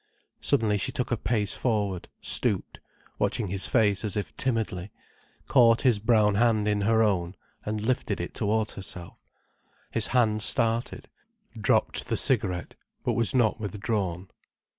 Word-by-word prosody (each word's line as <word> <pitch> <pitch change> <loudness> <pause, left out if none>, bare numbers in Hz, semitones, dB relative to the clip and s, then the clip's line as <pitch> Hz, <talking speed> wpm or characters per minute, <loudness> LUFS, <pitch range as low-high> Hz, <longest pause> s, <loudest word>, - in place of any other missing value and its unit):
Suddenly 105 -2 +1
she - - -1
took 125 - -3
a - - +3
pace 105 -2 -1
forward, 105 -7 -2
stooped, - - 0 0.4
watching 105 -5 -1
his 95 0 0
face 105 -5 +2
as 105 -1 -1
if 105 - -4
timidly, 110 -6 -2 0.6
caught 120 -3 +5
his 125 -6 +3
brown 110 -1 +3
hand 110 -1 +2
in 105 -1 +1
her 110 +2 +3
own 95 -4 0 0.3
and 105 0 -3
lifted 130 +1 -1
it - - -5
towards 110 +1 -1
herself. 90 -3 -8 0.7
His - - +3
hand 110 -4 +1
started, 115 +1 +1 0.5
dropped - - +1
the - - -1
cigarette, 90 -2 +1 0.3
but - - 0
was 115 +2 +1
not 115 -3 +2
withdrawn. 100 -4 -3
105 Hz, 140 wpm, -26 LUFS, 100-115 Hz, 0.7 s, caught